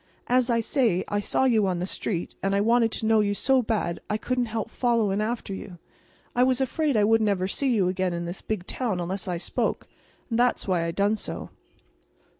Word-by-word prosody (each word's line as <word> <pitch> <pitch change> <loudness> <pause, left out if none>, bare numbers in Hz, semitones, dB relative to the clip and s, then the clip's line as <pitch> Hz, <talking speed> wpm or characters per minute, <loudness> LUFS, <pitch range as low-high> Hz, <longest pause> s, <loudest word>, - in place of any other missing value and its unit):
As 250 0 +2
I 230 -1 +2
say, 225 -7 +1
I 205 - 0
saw 205 - 0
you 225 -6 +3
on 180 -2 0
the 175 - -2
street, 185 -2 -3
and 195 0 0
I - - +3
wanted 230 +2 +3
to - - -3
know 220 0 +4
you 205 -1 +1
so 265 +4 +3
bad 215 -7 -1
I 210 - +1
couldn't 250 +2 -1
help 225 0 -4
followin' 225 -5 +1
after 220 -2 -3
you. 190 -2 -8 0.6
I 245 - +3
was 255 0 +3
afraid 275 0 0
I 210 - +4
wouldn't 220 0 +3
ever 185 -2 0
see 255 +5 0
you 195 -4 +2
again 185 0 0
in 170 0 -3
this 175 +2 -6
big 210 -5 -3
town 220 -6 -2
unless 190 +3 -3
I 180 -1 -1
spoke; 170 - -2 0.5
and 230 - +1
that's 245 -3 +2
why 175 -3 +1
I - - -1
done 200 +5 +1
so." - - -5
215 Hz, 220 wpm, -26 LUFS, 190-240 Hz, 0.6 s, know